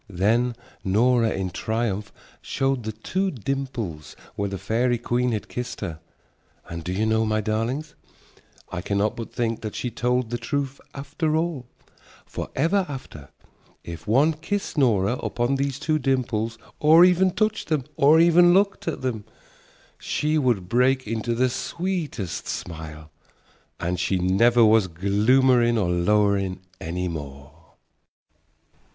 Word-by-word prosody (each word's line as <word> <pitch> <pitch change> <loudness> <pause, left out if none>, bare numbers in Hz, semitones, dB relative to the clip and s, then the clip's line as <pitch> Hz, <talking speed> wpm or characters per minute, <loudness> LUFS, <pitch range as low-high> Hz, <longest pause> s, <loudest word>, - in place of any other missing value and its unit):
Then 115 +6 +1 0.3
Nora 115 +4 +3
in 95 -3 -3
triumph 110 -2 -2 0.3
showed 135 -3 -1
the 110 - -2
two 185 - -2
dimples 120 - -4 0.2
where 100 0 -2
the 95 - -4
fairy 115 +5 0
queen 120 +1 0
had 105 -3 -3
kissed 125 0 -5
her. 85 -6 -5 0.7
And 85 0 -6
do 90 - -4
you 100 +4 0
know, 110 0 +2
my 110 0 0
darlings, 115 +8 -2 0.8
I 85 - -3
cannot 100 +3 0
but 115 - -7
think 115 -2 -2
that 110 -2 -5
she 125 - -3
told 125 +1 0
the 120 - -2
truth 140 +3 -3
after 150 +3 -2
all, 160 -6 -2 0.6
for - - -6
ever 180 +7 +2
after, 80 - -8 0.5
if 85 +3 -9
one 140 +9 +4
kissed 195 +6 -4
Nora 120 -5 +2
upon 120 +3 -1
those 135 -1 -1
two 155 +2 0
dimples 120 -4 -1 0.2
or 160 +3 +7
even 185 +1 +4
touched 215 +4 -1
them 155 -5 0
or 155 +2 +5
even 175 +1 +6
looked 195 -1 +1
at 165 - -2
them, 120 -5 -2 0.8
she 150 +1 -1
would 120 -11 +1
break 130 +4 +2
into 115 +2 -2
the 130 +2 +3
sweetest 155 - -3
smile, 80 -2 -7 0.7
and 90 +1 -2
she 95 +1 +1
never 115 +6 +4
was 110 -2 +4
gloomerin' 120 +7 +3
or 95 -5 +1
lowerin' 100 +1 +1 0.2
any 90 +2 -3
more. 70 -4 -7
120 Hz, 140 wpm, -24 LUFS, 100-140 Hz, 0.8 s, or